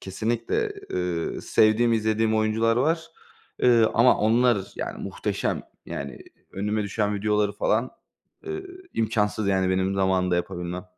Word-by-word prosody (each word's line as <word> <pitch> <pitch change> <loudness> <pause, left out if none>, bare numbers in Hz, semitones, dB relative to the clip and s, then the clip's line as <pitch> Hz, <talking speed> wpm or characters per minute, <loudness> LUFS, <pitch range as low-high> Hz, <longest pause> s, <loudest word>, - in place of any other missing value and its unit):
kesinlikle. 110 +5 -2 0.2
Eee, 90 -2 -2
sevdiğim, 110 +2 +3
izlediğim 110 0 +1
oyuncular 110 +1 +2
var, 160 +5 +1 0.6
eee, 120 -2 +6
ama 120 +2 +5
onlar 110 -2 +2
yani - - -5
muhteşem. - - -2 0.2
Yani 70 0 -6 0.3
önüme 105 +2 -1
düşen 105 +1 -1
videoları 105 0 +1
falan, 110 +4 0 0.6
eee, 390 -1 -4 0.3
imkânsız 110 -2 0
yani 95 -1 +2
benim 95 +1 +1
zamanında 95 -2 +1
yapabilmem. 90 +1 -4
105 Hz, 120 wpm, -25 LUFS, 95-115 Hz, 0.6 s, eee